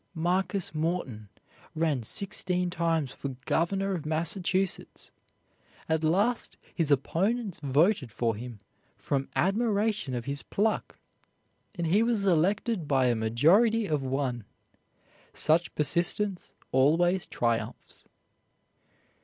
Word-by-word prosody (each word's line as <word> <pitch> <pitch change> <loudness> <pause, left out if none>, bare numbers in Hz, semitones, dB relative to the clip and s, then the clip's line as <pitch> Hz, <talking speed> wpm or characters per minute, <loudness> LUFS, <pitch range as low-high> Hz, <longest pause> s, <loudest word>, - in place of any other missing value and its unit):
Marcus 180 +2 0
Morton 155 - -3 0.5
ran 155 -5 0
sixteen 180 - -1
times 165 -5 0
for 135 -1 -6
governor 195 +4 0
of 170 -5 -3
Massachusetts. 175 +4 -1 0.8
At 160 0 0
last 200 +10 +1 0.2
his 165 -4 0
opponents 190 - 0
voted 145 - +2
for 115 0 -1
him 115 -1 -8 0.4
from 135 -1 -2
admiration 210 - 0
of 120 - -4
his 140 0 -3
pluck, 215 +2 -1 0.8
and 170 -2 -2
he 185 +7 +3
was 230 -3 +1
elected 190 +1 +1
by 130 -3 +3
a 120 - +2
majority 170 - +3
of 150 -6 -1
one! 130 -3 -2 0.9
Such 165 +3 +2
persistence 175 +5 0 0.2
always 170 +8 +3
triumphs. 115 -1 -3
165 Hz, 105 wpm, -28 LUFS, 140-195 Hz, 0.9 s, he